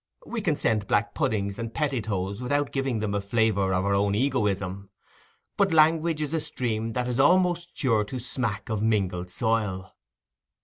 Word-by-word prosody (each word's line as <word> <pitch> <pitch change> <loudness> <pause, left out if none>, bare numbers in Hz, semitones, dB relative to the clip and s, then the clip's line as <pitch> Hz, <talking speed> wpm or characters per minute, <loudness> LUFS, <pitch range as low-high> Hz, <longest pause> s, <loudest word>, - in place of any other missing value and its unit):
We 235 -2 -4
can 165 -7 +1
send 105 -7 0
black 105 0 +1
puddings 105 -8 -1
and 115 -1 -4
pettitoes 105 -8 -2
without 145 +3 0
giving 135 -5 -1
them 105 -2 -1
a 100 - 0
flavour 100 -2 +1
of 95 +1 +1
our 100 - +2
own 100 0 +2
egoism; 100 -6 -1 0.7
but 200 -2 +3
language 160 0 +3
is 150 +1 -4
a 165 - +1
stream 115 -6 -3
that 125 +1 -1
is 125 +1 -2
almost 175 +3 +3
sure 115 -7 +2
to 130 - -6
smack 115 -4 -3
of 110 -2 -1
a - - +1
mingled 95 -5 0
soil. 100 -3 -1
110 Hz, 175 wpm, -26 LUFS, 100-140 Hz, 0.7 s, but